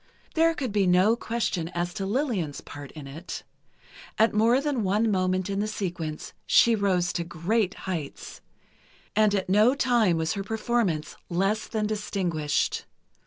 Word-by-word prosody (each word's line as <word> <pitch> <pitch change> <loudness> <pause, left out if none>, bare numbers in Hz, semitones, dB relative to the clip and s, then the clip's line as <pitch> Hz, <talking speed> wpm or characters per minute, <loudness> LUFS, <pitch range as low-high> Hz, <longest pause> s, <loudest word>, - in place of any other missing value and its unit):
There 330 0 +3
could 260 -7 -3
be 200 -2 +2
no 185 +5 +5
question 225 -8 -2
as 175 0 -1
to 195 - -3
Lillian's 205 - -1
part 145 -1 -10
in 150 -3 -9
it. 155 +6 -7 0.7
At 220 0 +4
more 225 +4 +4
than 280 -4 -1
one 210 +3 +2
moment 185 -1 +1
in 200 0 -2
the 210 - 0
sequence 175 -7 -4
she 235 - +6
rose 185 -4 +1
to 170 - -1
great 185 +5 -1
heights, 165 -7 -5 0.7
and 210 -1 +4
at 190 - -1
no 210 +7 +4
time 235 - +3
was 160 0 0
her 200 - -3
performance 215 -6 -1
less 195 +5 0
than 215 -2 -1
distinguished. 180 -8 -1
195 Hz, 155 wpm, -26 LUFS, 175-220 Hz, 0.7 s, she